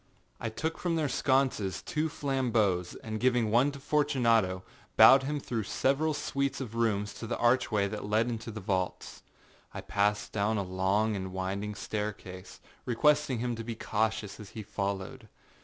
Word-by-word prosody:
I 115 - -3
took 160 +9 -3
from 175 -2 0
their 155 -2 +1
sconces 130 -8 +1
two 160 -2 -1
flambeaux, 120 -11 +1 0.2
and 110 -1 -4
giving 120 -3 +2
one 125 +5 +4
to 140 - -8
Fortunato, 120 -11 +2 0.3
bowed 135 0 +9
him 145 +2 -2
through 120 -4 -3
several 140 +8 0
suites 140 -1 -2
of 125 -5 -6
rooms 105 -3 0
to 115 - -7
the 120 - -2
archway 120 -4 +2
that 105 0 -5
led 110 +3 +2
into 115 -1 -4
the 110 -1 -6
vaults. 95 -2 -3 0.5
I - - -4
passed 105 +1 0
down 105 +1 0
a 100 - 0
long 95 +4 +1
and 95 -1 -4
winding 100 +3 -3
staircase, 100 -4 -5 0.2
requesting 145 +2 +2
him 120 +1 -2
to 115 - -6
be 115 0 -5
cautious 110 -1 -2
as 105 -2 -9
he 110 - -4
followed. 100 +4 -4
110 Hz, 165 wpm, -30 LUFS, 100-130 Hz, 0.5 s, bowed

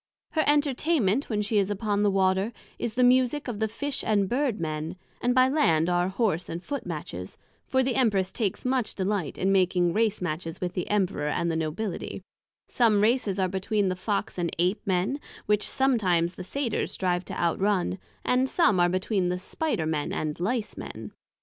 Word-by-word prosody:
Her 315 - +2
Entertainment 285 - +2
when 210 -2 0
she 210 0 +2
is 200 0 +1
upon 205 0 0
the 205 - +4
Water, 190 +2 +2 0.3
is 230 -2 -3
the 250 - +3
Musick 255 +3 +3
of 230 -4 -4
the 220 - +1
Fish 275 +6 -3
and 205 -3 +2
Bird 250 -1 0
men; 155 +1 -3 0.3
and 245 0 +1
by 255 0 +6
Land 175 - +3
are 175 0 +2
Horse 190 -4 0
and 170 +2 -5
Foot 280 -9 -4
matches; 120 - -6 0.3
for 260 0 +2
the 260 0 0
Empress 205 -8 +2
takes 210 -2 -2
much 255 -3 0
delight 190 -5 -1
in 190 +1 +1
making 180 -2 +3
Race 215 0 +1
matches 165 -1 -4
with 180 -1 -3
the 180 - -3
Emperor, 195 -7 0
and 170 +3 0
the - - -1
Nobility; 165 +5 -3 0.4
some 225 -4 +3
Races 220 -3 +2
are 190 -1 +2
between 195 +2 0
the 185 - -1
Fox 195 0 -2
and 170 -1 0
Ape 180 +5 +1
men, 190 +9 +1 0.3
which 210 0 +1
sometimes 185 -10 +2
the 185 - -8
Satyrs 240 +3 -2
strive 180 -1 0
to - - -6
outrun; 185 +2 +1 0.3
and 255 +1 +2
some 215 - +3
are 175 0 +4
between 185 0 0
the 180 - -1
Spider 185 - -2
men 155 -2 -1
and 150 -1 -2
Licemen. 215 +4 -3
200 Hz, 185 wpm, -27 LUFS, 180-240 Hz, 0.4 s, by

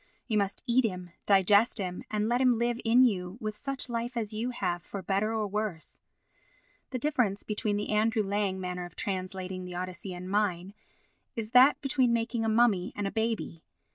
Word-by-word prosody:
You 220 - -1
must 200 -1 -1
eat 255 +1 +3
him, 180 -5 -3 0.2
digest 205 +4 +5
him 180 -3 -3
and 215 0 0
let 240 +2 +1
him 250 -3 +4
live 235 +1 0
in 240 +3 +5
you, 190 -5 0
with 215 -2 -4
such 275 +3 -4
life 240 +1 -3
as 220 -2 -3
you 225 +3 -2
have, 175 -8 -2
for 195 +2 -7
better 200 +3 0
or 220 -1 0
worse. 205 -5 -4 0.9
The 255 - -3
difference 245 -8 0
between 210 -1 -1
the 205 - -3
Andrew 215 +1 +2
Lang 200 -1 -1
manner 180 -1 -4
of 175 - -12
translating 185 -1 -4
the 180 -1 -7
Odyssey 185 +1 -5
and 180 +1 -7
mine 195 -2 0 0.6
is 225 -2 -4
that 255 +4 +7
between 265 -4 +2
making 230 0 -1
a 225 - +1
mummy 220 -5 +3
and 205 - -2
a 195 - -1
baby. 220 -7 -2
210 Hz, 190 wpm, -29 LUFS, 190-235 Hz, 0.9 s, that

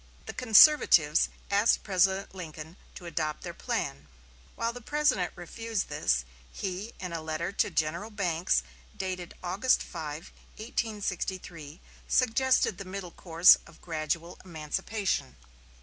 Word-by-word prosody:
The - - -6
conservatives 220 - +6 0.2
asked 205 +3 +3
President 190 0 +1
Lincoln 160 -2 -8 0.2
to 180 - -10
adopt 155 -3 -3
their - - -6
plan. 75 +2 -3 0.5
While 230 0 -1
the 245 - -9
President 290 -9 +1
refused 225 +4 -4
this, 65 - 0 0.3
he 195 +4 -5
in 180 -2 -5
a 165 - -3
letter 160 +3 -3
to 200 - +1
General 165 +7 -1
Banks 175 - 0 0.3
dated 185 -2 -4
August 195 +8 +2
5, 155 -1 -7 0.2
1863, 190 - -4 0.3
suggested 255 -4 +2
the - - -4
middle 185 -1 -7
course 170 0 +6
of 170 - -17
gradual 165 +1 -3
emancipation. 185 +5 -3
180 Hz, 120 wpm, -29 LUFS, 160-210 Hz, 0.5 s, conservatives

